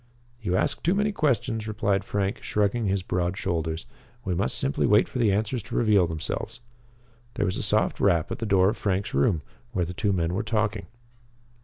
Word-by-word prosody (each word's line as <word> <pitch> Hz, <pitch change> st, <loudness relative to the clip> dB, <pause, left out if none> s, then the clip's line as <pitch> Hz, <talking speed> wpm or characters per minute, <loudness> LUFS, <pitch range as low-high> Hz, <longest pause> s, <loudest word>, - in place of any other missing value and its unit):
"You 90 Hz, -5 st, -1 dB
ask 145 Hz, +8 st, 0 dB
too 175 Hz, +4 st, +2 dB
many 205 Hz, +1 st, +1 dB
questions," 120 Hz, -, 0 dB
replied 100 Hz, -2 st, 0 dB
Frank, 100 Hz, +2 st, -2 dB
shrugging 105 Hz, +2 st, 0 dB
his 95 Hz, -1 st, 0 dB
broad 90 Hz, +1 st, -1 dB
shoulders. 80 Hz, -3 st, -2 dB, 0.4 s
"We 90 Hz, -, 0 dB
must 85 Hz, -6 st, +1 dB
simply 70 Hz, +2 st, +1 dB
wait 105 Hz, +1 st, +5 dB
for 125 Hz, -, -5 dB
the 110 Hz, -4 st, +4 dB
answers 110 Hz, +5 st, 0 dB
to 105 Hz, -, -8 dB
reveal 105 Hz, -6 st, +4 dB
themselves." 80 Hz, -1 st, -4 dB, 0.8 s
There -, -, 0 dB
was 95 Hz, 0 st, -1 dB
a -, -, -2 dB
soft 105 Hz, +1 st, +1 dB
rap 85 Hz, -6 st, +2 dB
at -, -, -4 dB
the 115 Hz, -, -3 dB
door 95 Hz, -1 st, +4 dB
of 110 Hz, -, -3 dB
Frank's 100 Hz, -1 st, -1 dB
room, 75 Hz, +3 st, +2 dB, 0.3 s
where 90 Hz, -5 st, +1 dB
the 90 Hz, -, -6 dB
two 100 Hz, +2 st, 0 dB
men 85 Hz, -2 st, 0 dB
were 95 Hz, -, 0 dB
talking. 105 Hz, -2 st, -1 dB
100 Hz, 195 wpm, -26 LUFS, 90-110 Hz, 0.8 s, wait